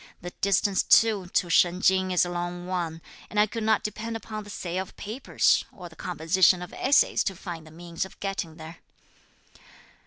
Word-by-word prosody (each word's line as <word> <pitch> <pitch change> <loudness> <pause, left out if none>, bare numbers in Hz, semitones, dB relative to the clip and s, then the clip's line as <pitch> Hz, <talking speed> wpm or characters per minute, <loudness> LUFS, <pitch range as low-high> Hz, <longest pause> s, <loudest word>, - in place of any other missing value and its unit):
The 175 - -7
distance 200 0 +2
too 215 -5 +4
to 180 - 0
Shen 180 +1 +4
Ching 190 0 +3
is 180 -1 +3
a - - -4
long 175 0 -4
one, 170 -3 -3 0.3
and 210 - -1
I 210 - +6
could 225 +2 -6
not 220 -1 +2
depend 225 +2 -4
upon 215 -1 -7
the 205 - -13
sale 185 -2 -3
of 190 - -10
papers 225 +6 +1
or 180 -3 -10
the 160 - -17
composition 180 +2 +2
of 180 - -10
essays 275 +2 +3
to 195 - -2
find 170 -3 -8
the - - -12
means 170 +1 -5
of 190 - -11
getting 195 -5 -4
there." 165 +1 -10
185 Hz, 190 wpm, -26 LUFS, 175-205 Hz, 0.3 s, I